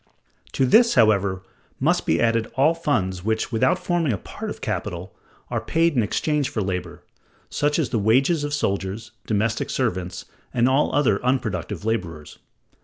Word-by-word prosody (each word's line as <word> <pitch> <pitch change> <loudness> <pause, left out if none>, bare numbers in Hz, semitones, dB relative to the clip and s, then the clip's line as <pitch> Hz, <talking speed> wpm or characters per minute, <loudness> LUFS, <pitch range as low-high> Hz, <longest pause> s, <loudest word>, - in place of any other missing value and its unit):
To 135 - +2
this, 235 - +5
however, 100 -3 +3 0.4
must - - +1
be 80 - +2
added 115 -1 +2
all 145 +5 +4
funds 100 - -1
which, 110 +3 -1
without 130 +8 +2
forming 175 -5 0
a 105 - -1
part - - -7
of - - -7
capital, 90 +2 -4 0.4
are - - -1
paid 165 -1 +1
in 120 - +3
exchange 145 +7 0
for 110 - -2
labor, 90 -2 -4 0.5
such 145 0 +1
as 155 -7 0
the 115 - 0
wages 135 - +2
of 145 - -3
soldiers, 100 -4 -2 0.2
domestic 110 +2 0
servants, 90 -7 -2 0.3
and 120 0 +3
all 135 +3 +2
other 130 -9 +2
unproductive 105 -7 -2
laborers. 85 -9 -4
115 Hz, 160 wpm, -23 LUFS, 95-140 Hz, 0.5 s, this